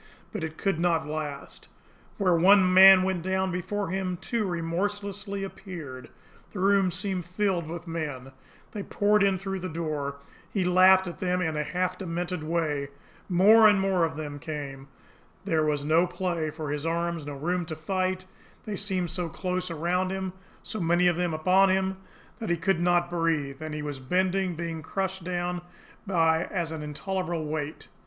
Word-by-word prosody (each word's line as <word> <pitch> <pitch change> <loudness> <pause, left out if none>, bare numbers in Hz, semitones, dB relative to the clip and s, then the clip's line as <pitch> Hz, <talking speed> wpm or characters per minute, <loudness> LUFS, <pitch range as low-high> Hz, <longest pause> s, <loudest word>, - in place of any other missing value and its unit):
But 210 -6 -4
it 160 0 -5
could 195 -5 0
not 170 -2 +2
last. 150 -2 -6 0.5
Where 190 -4 +3
one 185 +2 +5
man 190 0 +9
went 190 -2 -1
down 190 +1 0
before 195 +2 -3
him, 185 -1 -2
two 220 +4 -2
remorselessly 200 +3 -3
appeared 165 -10 -8 0.4
the 200 - -6
room 195 0 +4
seemed 185 0 -2
filled 180 -3 0
with 170 +1 -6
men 150 -6 -5 0.4
they 210 - -5
poured 205 +1 +2
in 195 -1 +3
through 195 +1 -4
the 185 0 -4
door 155 -4 -3 0.4
he 195 - 0
laughed 185 +1 +6
at 175 - -7
them 180 -1 0
in 160 -4 -1
a 150 - 0
half 180 +4 -2
demented 175 -1 -3
way 155 -3 -1 0.4
more 210 +5 +7
and 205 -2 +5
more 190 -2 +2
of 160 -2 0
them 145 -1 -6
came 140 -3 -6 0.6
there 160 -5 +2
was 145 -1 0
no 165 +4 +4
play 175 -3 -2
for 155 -1 -5
his 145 -1 -3
arms, 170 -1 -2
no 145 - -5
room 175 +5 -1
to 160 - -4
fight 185 +3 -2 0.4
they 210 - -3
seemed 185 -3 -1
so 175 -2 -2
close 180 +1 -3
around 175 +3 0
him, 190 -1 -3 0.3
so 215 - -5
many 175 +1 +2
of 175 -1 +4
them 175 0 0
upon 185 +5 +4
him, 190 0 +1 0.4
that 225 - -4
he 175 - +2
could 180 +1 +1
not 175 0 +2
breathe 155 -5 -1
and 155 -1 -5
he 150 - -4
was 145 -2 -4
bending, 185 +5 0
being 165 -1 -4
crushed 190 +3 -3
down 180 0 -2
as - - -7 0.5
by 165 -3 +3 0.3
an 155 - -6
intolerable 170 +2 -3
weight. 150 0 -4
175 Hz, 175 wpm, -27 LUFS, 160-190 Hz, 0.6 s, man